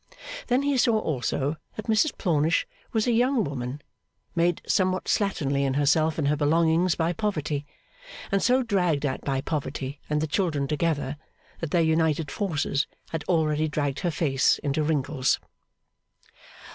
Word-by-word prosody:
Then 250 +3 +2
he 285 -1 +1
saw, 235 -3 +4
also, 145 - -1 0.2
that 215 - -6
Mrs 225 +8 +2
Plornish 160 -3 +2 0.3
was 220 -2 +1
a 245 - +2
young 245 +1 +3
woman, 140 0 -5 0.5
made 170 0 +1
somewhat 185 -2 +1
slatternly 145 -9 0
in 135 -1 0
herself 155 +2 +2
and 150 -3 0
her 150 - +3
belongings 165 +4 +2
by 165 +1 0
poverty; 155 -7 -2 0.6
and 195 0 +2
so 255 +2 +3
dragged 180 - +1
at 130 -2 -2
by 135 -1 -1
poverty 140 -2 -4
and 150 0 +1
the 155 - 0
children 155 -3 0
together, 150 -2 -1 0.4
that 165 - -3
their 170 +1 +3
united 160 -1 +1
forces 155 -7 -1 0.2
had 160 -2 -3
already 155 -3 +1
dragged 145 -2 -2
her 180 - 0
face 140 -5 +2
into 145 +2 0
wrinkles. 150 -3 +1
155 Hz, 150 wpm, -26 LUFS, 145-185 Hz, 0.6 s, saw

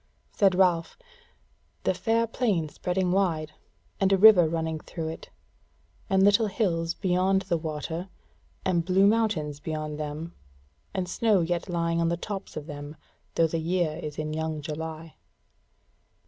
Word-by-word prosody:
Said 195 -3 +3
Ralph: 180 -3 +2 0.9
"The - - +2
fair 230 0 +1
plain 210 -9 0
spreading 180 +3 -1
wide, 165 -5 +1 0.5
and 195 0 +2
a 195 - +5
river 190 -5 +8
running 160 -1 -2
through 160 0 -5
it, 160 - -8 0.8
and 190 -1 +4
little 205 +2 +5
hills 170 -5 -1
beyond 190 +1 +1
the 180 -2 0
water, 160 +3 -4 0.6
and 175 -3 +2
blue 190 +3 +3
mountains 200 -10 +1
beyond 155 -1 -4
them, 155 +3 -5 0.6
and 185 -1 -2
snow 210 0 +2
yet 170 +2 -2
lying 170 -1 0
on 165 - +2
the 170 - -1
tops 195 -2 -6
of 150 - -5
them, 145 -1 -8 0.4
though 165 - +4
the 165 +1 -1
year 165 -1 0
is 150 -1 -6
in 155 0 -3
young 160 0 -2
July." 160 +1 -6
170 Hz, 145 wpm, -27 LUFS, 160-190 Hz, 0.9 s, river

